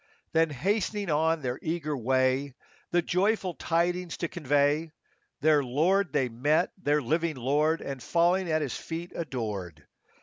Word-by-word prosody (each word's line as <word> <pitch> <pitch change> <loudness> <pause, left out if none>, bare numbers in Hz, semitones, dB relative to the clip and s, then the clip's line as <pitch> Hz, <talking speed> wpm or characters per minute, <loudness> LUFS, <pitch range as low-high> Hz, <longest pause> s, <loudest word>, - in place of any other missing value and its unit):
Then 165 0 +3
hastening 200 - -1
on 160 +1 +1
their 125 0 -2
eager 160 -2 -2
way, 130 +2 +1 0.3
The 175 0 +2
joyful 190 +1 +1
tidings 175 +1 -1
to 170 - -2
convey, 145 0 +1 0.5
Their 150 -1 +4
Lord 165 +8 +2
they 130 - +1
met, 145 +9 +1
their 150 -5 0
living 160 +5 0
Lord, 150 +6 +1
And 135 -2 -6
falling 175 +4 +2
at 155 -1 +1
His 135 - -3
feet 170 +2 -6
adored. 105 - -5
155 Hz, 140 wpm, -28 LUFS, 135-170 Hz, 0.5 s, Their